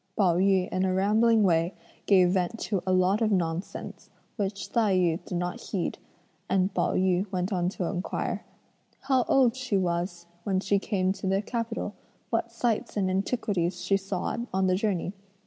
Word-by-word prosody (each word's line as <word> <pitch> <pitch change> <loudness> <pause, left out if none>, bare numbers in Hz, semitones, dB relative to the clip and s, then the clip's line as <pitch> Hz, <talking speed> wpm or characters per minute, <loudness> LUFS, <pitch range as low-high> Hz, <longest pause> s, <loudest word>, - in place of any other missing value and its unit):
Pao 180 -5 +3
yü 190 -1 +3
in 185 - 0
a 190 - +1
rambling 215 +3 +4
way 170 -1 +2 0.3
gave 185 -3 +6
vent 185 +3 0
to 200 -4 -1
a - - +2
lot 185 +3 +3
of 220 -1 +2
nonsense, 175 -1 -3 0.3
which 200 -2 -3
Tai 220 -5 +3
yü 175 -1 +1
did 180 - -4
not 175 0 -3
heed, 185 -4 -3 0.5
and 190 0 +2
Pao - - +1
yü 185 +1 +1
went 185 +1 -1
on 180 -1 +1
to 185 -1 -3
inquire: 180 +2 -3 0.6
"How 265 -2 +2
old 255 -3 +4
she 255 -6 -1
was 175 -1 -1 0.2
when 190 -2 +1
she 200 +1 +1
came 190 -2 0
to 195 - -5
the 195 +2 +1
capital? 230 -2 -3 0.4
what 230 0 0
sights 230 -2 -1
and 190 -2 +1
antiquities 190 -3 -1
she 195 +2 +2
saw 195 -1 -2 0.2
on 190 0 +1
the 185 - +3
journey? 190 -2 -1
190 Hz, 175 wpm, -27 LUFS, 180-210 Hz, 0.6 s, gave